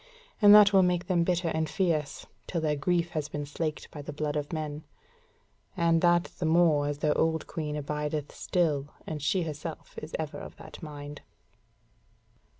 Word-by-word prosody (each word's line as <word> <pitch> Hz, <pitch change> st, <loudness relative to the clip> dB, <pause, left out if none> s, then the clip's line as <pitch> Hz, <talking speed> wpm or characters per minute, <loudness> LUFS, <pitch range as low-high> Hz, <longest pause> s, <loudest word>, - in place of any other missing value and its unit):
And 205 Hz, -1 st, +8 dB
that 205 Hz, -1 st, +8 dB
will 190 Hz, -, +7 dB
make 180 Hz, -1 st, +1 dB
them 175 Hz, -3 st, +2 dB
bitter 175 Hz, -1 st, 0 dB
and 160 Hz, 0 st, -1 dB
fierce, 160 Hz, -6 st, -1 dB, 0.2 s
till 170 Hz, -, -2 dB
their 155 Hz, -2 st, 0 dB
grief 170 Hz, +4 st, 0 dB
has 150 Hz, -2 st, -3 dB
been 145 Hz, 0 st, -4 dB
slaked 155 Hz, +1 st, -4 dB
by 150 Hz, -, -7 dB
the 145 Hz, -, -7 dB
blood 150 Hz, 0 st, -3 dB
of 145 Hz, -1 st, -3 dB
men. 155 Hz, -2 st, -4 dB, 0.9 s
And 165 Hz, -1 st, +3 dB
that 175 Hz, -1 st, +4 dB, 0.2 s
the 170 Hz, -, -1 dB
more 160 Hz, -3 st, +4 dB
as 145 Hz, 0 st, -2 dB
their 150 Hz, 0 st, +1 dB
old 160 Hz, -1 st, +1 dB
Queen 150 Hz, -2 st, -4 dB
abideth 150 Hz, 0 st, -3 dB
still, 150 Hz, -6 st, 0 dB, 0.2 s
and 155 Hz, -2 st, -5 dB
she 175 Hz, +5 st, +1 dB
herself 155 Hz, 0 st, -7 dB
is 155 Hz, -, -7 dB
ever 155 Hz, -1 st, -4 dB
of -, -, -9 dB
that -, -, -12 dB
mind." 145 Hz, -2 st, -8 dB
155 Hz, 175 wpm, -29 LUFS, 150-170 Hz, 0.9 s, And